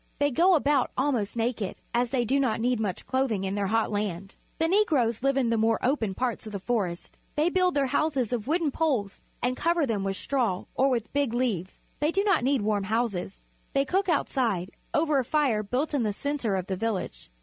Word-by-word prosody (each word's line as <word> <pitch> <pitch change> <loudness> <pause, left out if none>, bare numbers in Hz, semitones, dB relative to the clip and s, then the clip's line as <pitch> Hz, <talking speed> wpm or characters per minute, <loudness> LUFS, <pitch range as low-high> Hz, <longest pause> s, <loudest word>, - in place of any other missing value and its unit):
They 285 0 +2
go 350 +7 +5
about 285 -3 +2
almost 255 -7 0
naked, 225 -4 -1 0.2
as 240 0 +1
they 245 -1 0
do 270 +5 +2
not 250 -5 +1
need 245 0 +1
much 205 -4 -3
clothing 260 -7 0
in 190 0 -2
their 200 -1 -1
hot 225 +2 +1
land. 195 -2 -3 0.2
The 325 - +2
Negroes 300 - +2
live 275 +1 +2
in 245 -4 +2
the 230 - +2
more 225 +1 +3
open 230 -7 0
parts 245 -2 -2
of 215 - -8
the 200 - -3
forests. 190 -5 -3 0.2
They 305 +3 +2
build 365 -2 +2
their 280 -1 +3
houses 265 -3 0
of 235 -1 -2
wooden 320 -1 +1
poles 260 -11 -1 0.2
and 250 +1 +1
cover 335 +2 +1
them 215 -6 -1
with 195 -1 -2
straw 235 -10 -1
or 270 +1 +3
with 235 -4 -2
big 280 -5 0
leaves. 210 -8 -2
They 300 +2 +2
do 395 +3 +1
not 395 -10 +2
need 265 -3 +2
warm 205 -2 0
houses. 210 -3 -2 0.3
They 275 0 +2
cook 380 +6 0
outside, 230 - 0 0.2
over 305 -2 +2
a - - +1
fire 260 -5 +1
built 255 +9 -2
in 285 - +1
the 215 -3 0
centre 275 -4 -2
of 185 -2 -2
the 190 - -2
village. 190 - -3
245 Hz, 215 wpm, -27 LUFS, 210-285 Hz, 0.3 s, go